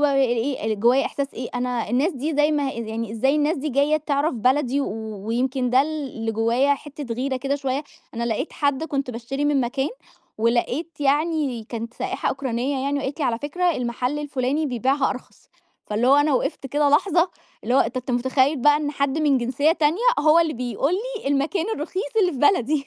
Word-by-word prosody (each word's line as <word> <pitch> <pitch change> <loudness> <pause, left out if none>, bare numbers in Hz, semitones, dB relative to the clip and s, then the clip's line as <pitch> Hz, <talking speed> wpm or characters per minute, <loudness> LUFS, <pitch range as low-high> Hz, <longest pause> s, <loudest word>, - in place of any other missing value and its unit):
بقى 280 -2 +3
إيه، 240 -3 +1
جوايا 240 +6 +3
إحساس 280 -1 -4
إيه، 245 0 -5
أنا 245 -2 -2
الناس 275 +9 +2
دي 295 +3 -3
زي 295 +1 +4
ما 290 -3 0
يعني، 225 -1 -4
إزاي 265 +5 +2
الناس 300 +2 +1
دي 300 +2 -3
جاية 285 +3 +2
تعرَف 295 0 0
بلدي 260 +3 +1
و 215 -4 -5
ويمكن 250 +2 0
ده 255 +2 +5
اللي 275 -7 -4
جوايا 235 +6 +2
حِتّة 280 -3 -7
غِيرة 260 +2 -1
كده 275 +2 -1
شوية، 275 0 -2 0.3
أنا 235 +1 -2
لقيت 235 +6 -2
حد 285 0 0
كنت 275 -5 -2
باشتري 250 +4 -4
من 290 -2 +2
مكان، 270 +3 -1 0.5
ولقيت 245 +8 0
يعني 290 -4 +1
كانت 230 0 -6
سائحة - - -2
أوكرانية 265 0 -2
يعني 280 +1 0
وقالت 275 +2 -4
لي: 285 - +1
"على 230 -2 0
فكرة 350 +6 0
المحَل 250 0 -2
الفلاني 290 +1 -1
بيبيعها 265 +2 +1
أرخص." 255 - -9 0.4
فاللي 220 +4 0
هو 270 - +6
أنا 290 0 +3
وقِفت 265 - -1
كده 290 +2 +2
لحظة، 345 +3 +3 0.3
اللي 245 - 0
هو - - +6
أنت 230 +3 -1
أنت 255 0 -3
متخيّل 260 +4 +2
بقى 295 +3 +5
إن 295 -1 -2
حد 280 0 -1
من 290 -4 +3
جنسيّة 265 +6 +2
تانية 320 +1 +1 0.2
هو 310 +2 +5
اللي 325 -2 +2
بيقول 250 +5 -1
لي 450 - -4
المكان 295 +6 0
الرخيص 375 +10 -4
اللي 360 - +2
في 270 - -6
بلدي 290 - +2
275 Hz, 190 wpm, -23 LUFS, 245-295 Hz, 0.5 s, هو